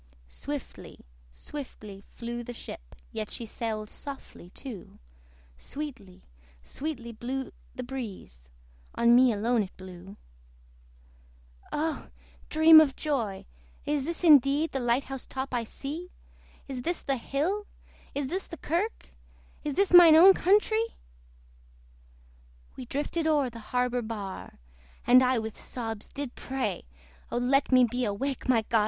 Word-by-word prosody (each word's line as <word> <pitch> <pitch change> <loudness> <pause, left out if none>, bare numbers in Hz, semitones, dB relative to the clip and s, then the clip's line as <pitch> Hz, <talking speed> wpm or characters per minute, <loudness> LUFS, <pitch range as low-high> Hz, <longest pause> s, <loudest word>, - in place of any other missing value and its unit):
Swiftly, - - -7 0.3
swiftly 210 - -9
flew 240 0 -6
the 245 +1 -7
ship, - - -10 0.2
Yet 215 - -4
she 235 - -5
sailed 215 -1 -3
softly 275 -9 -9
too: 225 -1 -9 0.6
Sweetly, 255 -11 -7 0.4
sweetly 265 - -5
blew 255 +4 -4 0.2
the 255 - -4
breeze 205 - -8 0.5
On 235 0 +5
me 250 0 +6
alone 225 +2 +1
it 190 - -6
blew. 185 +1 -11 1.5
Oh! 310 +1 -2 0.4
dream 315 0 +9
of 280 -4 +1
joy! 235 -11 -2 0.4
is 290 -2 0
this 335 +2 -4
indeed 290 0 +5
The 270 - -2
light 240 +2 +1
house 270 0 -7
top 265 0 -4
I 240 -1 0
see? 300 +9 -6 0.6
Is 265 -2 -5
this 340 +6 -2
the 275 -1 0
hill? 335 - -2 0.5
is 285 0 -1
this 370 +7 -3
the 335 - -8
kirk? 350 +10 -2 0.5
Is 295 -2 -2
this 395 +1 +2
mine 345 -3 +10
own 370 +4 +9
countree! 435 +5 +2 1.8
We 250 - -8
drifted 300 +5 -2
o'er 290 -5 +2
the 230 - -9
harbour 250 0 +1
bar, 210 -4 -6 0.5
And 250 +1 +7
I 255 0 +3
with 220 -1 -4
sobs 225 -4 -5
did 280 -3 -5
pray 255 - -3 0.4
O - - -1
let 265 +4 +2
me 255 -1 +7
be 245 +1 0
awake, 255 +6 -2
my 230 -3 +4
God! 225 - +3
255 Hz, 135 wpm, -28 LUFS, 225-295 Hz, 1.8 s, mine